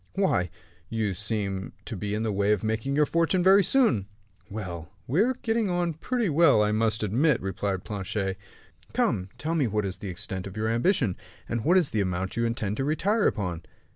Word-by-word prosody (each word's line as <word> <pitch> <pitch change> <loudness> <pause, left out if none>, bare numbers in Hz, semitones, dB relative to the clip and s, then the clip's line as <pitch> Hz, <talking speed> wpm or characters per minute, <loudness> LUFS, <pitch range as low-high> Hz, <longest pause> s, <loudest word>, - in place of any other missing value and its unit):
"Why, 185 - +1 0.4
you 110 -3 -1
seem 100 -1 -2
to - - -5
be 105 0 -3
in 110 - -1
the 110 - 0
way 100 +1 +2
of 105 - -2
making 110 +5 -1
your 150 0 +4
fortune 170 +3 +1
very 195 +2 +7
soon." 175 - +3 0.4
"Well, 90 -6 -6 0.2
we 150 +10 +2
are 255 +4 +2
getting 225 -2 +1
on 175 -1 0
pretty 235 +8 -1
well, 150 -8 +5
I 105 - +1
must 110 0 +1
admit," 125 +7 +2
replied 95 0 -2
Planchet. 95 -1 -3 0.6
"Come, 90 0 +1
tell 160 +2 -2
me 150 -6 +2
what 105 -1 -1
is 95 -1 -4
the 100 - -5
extent 90 +1 -3
of 95 +2 -9
your 110 +1 0
ambition, 120 - +1 0.3
and 115 -1 -2
what 175 +4 +4
is 175 -6 +2
the 110 - +1
amount 95 0 -2
you 115 - +1
intend 110 -3 -2
to 135 - 0
retire 200 +9 +2
upon?" 90 -5 -2
110 Hz, 200 wpm, -27 LUFS, 100-165 Hz, 0.6 s, very